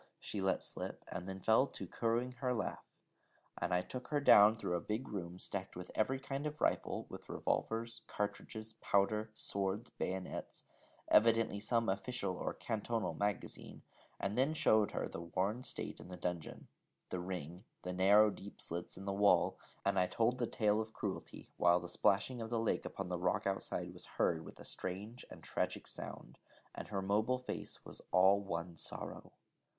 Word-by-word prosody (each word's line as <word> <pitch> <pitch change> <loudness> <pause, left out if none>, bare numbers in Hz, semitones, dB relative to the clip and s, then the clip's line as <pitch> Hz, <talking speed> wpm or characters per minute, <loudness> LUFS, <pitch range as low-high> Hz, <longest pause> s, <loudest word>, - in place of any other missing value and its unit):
she 100 - -4
let 95 0 +2
slip, - - -5
and 90 +2 -4
then 95 0 -5
fell 110 +7 +5
to - - -7
cooing 120 +2 0
her 125 0 -1
laugh; 110 - -3 0.7
and - - -1
I 90 0 +3
took 125 +5 -6
her 150 - +1
down 105 -6 +8
through 115 -5 -2
a - - +1
big 110 +5 -2
room 90 -3 -5
stacked 95 +1 -3
with 90 0 -7
every 130 +5 +2
kind 135 +2 -3
of 150 0 -6
rifle, - - +1
with - - -10
revolvers, 115 +1 -1
cartridges, 110 +1 -4
powder, 105 +2 +2
swords, 100 +3 -1
bayonets 95 0 -4 0.4
evidently 115 -2 +5
some 115 +2 +1
official 95 -1 -1
or - - -3
cantonal 115 +1 -1
magazine 100 -1 -3 0.4
and 100 +1 -1
then 135 +5 +3
showed 110 -8 +4
her - - -2
the - - -6
worn 95 +7 -1
stone - - -3
in - - -10
the 90 0 -7
dungeon, 85 -3 -4 0.4
the 90 - -1
ring, 90 0 -5 0.2
the 90 - -3
narrow 100 +3 +6
deep 100 +1 -10
slits 85 +1 -4
in 95 - -7
the 100 - -1
wall, 100 -3 +4 0.3
and - - +3
I 90 - +4
told 120 +5 +1
the 120 - +1
tale 105 -1 +2
of 110 0 -6
cruelty, 100 -3 -5
while 90 0 +5
the 90 - -6
splashing 110 +7 +2
of 115 - -4
the 120 - 0
lake 115 - +1
upon - - -4
the 90 -1 -1
rock 90 +4 +1
outside 100 -1 -1
was - - -7
heard 80 -1 +2
with - - -11
a - - -10
strange 105 +7 -5
and - - -11
tragic - - -2
sound, - - -7 0.3
and - - -6
her 100 -2 -2
mobile 110 +6 +2
face 125 - -5
was - - -9
all 95 +2 +6
one 85 -3 -4
sorrow. - - -5
100 Hz, 180 wpm, -36 LUFS, 90-115 Hz, 0.7 s, down